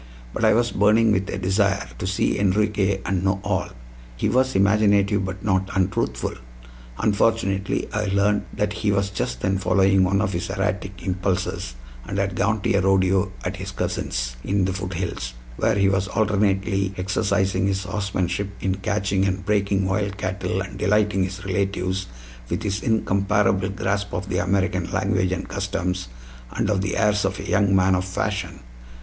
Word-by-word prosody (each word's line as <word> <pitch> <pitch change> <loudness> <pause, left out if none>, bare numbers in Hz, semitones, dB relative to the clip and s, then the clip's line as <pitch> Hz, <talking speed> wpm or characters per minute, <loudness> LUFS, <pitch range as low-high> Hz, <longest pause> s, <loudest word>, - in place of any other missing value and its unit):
But - - -3
I - - +5
was 120 +1 +2
burning 110 +2 +4
with 95 -1 0
a - - -3
desire 100 +1 +1
to 90 - -3
see 95 +1 0
Enriquez 100 -1 +1
and 90 0 0
know 95 0 +1
all. - - -1 0.5
He 105 - 0
was 130 +3 +2
imaginative 100 0 +3
but 95 +2 -5
not 95 -2 +1
untruthful. 95 0 0 0.6
Unfortunately, 100 -2 +1
I 105 0 0
learned 100 +1 +1
that 105 0 -1
he 105 -1 0
was 100 0 0
just 60 -9 -3
then 95 -1 +1
following 95 0 +3
one 95 +1 +2
of 100 -1 0
his 85 +2 -3
erratic 95 0 -3
impulses, 95 -8 -2 0.3
and 95 - -5
had 100 -1 0
gone 105 +2 +1
to - - +1
a 100 - +3
rodeo 95 0 +2
at 90 0 -3
his 95 +1 -6
cousin's, - - -3
in 100 -1 +1
the 95 - -1
foothills, 90 -10 -4 0.2
where 115 - +2
he 100 -1 +3
was 95 0 +1
alternately 100 -1 +1
exercising 95 0 +1
his 95 0 -1
horsemanship 100 -1 -2
in 95 - 0
catching 100 -1 0
and 95 -1 -2
breaking 100 -1 +1
wild 100 +1 -1
cattle 95 -1 -2
and 95 - -7
delighting 105 -1 +2
his 95 +2 -7
relatives 95 -1 -1 0.4
with 90 +6 -2
his 100 -1 -1
incomparable 100 -3 +1
grasp 100 +1 -2
of 90 +2 -4
the - - 0
American 90 -1 0
language 95 -2 +1
and 95 +1 -3
customs, 95 -4 -2 0.5
and 105 - 0
of 95 -2 +1
the 100 - -2
airs 105 -1 +2
of 95 +1 -1
a - - -6
young 95 +2 +3
man 95 0 +4
of 90 0 +1
fashion. 90 -4 -3
95 Hz, 170 wpm, -23 LUFS, 95-100 Hz, 0.6 s, I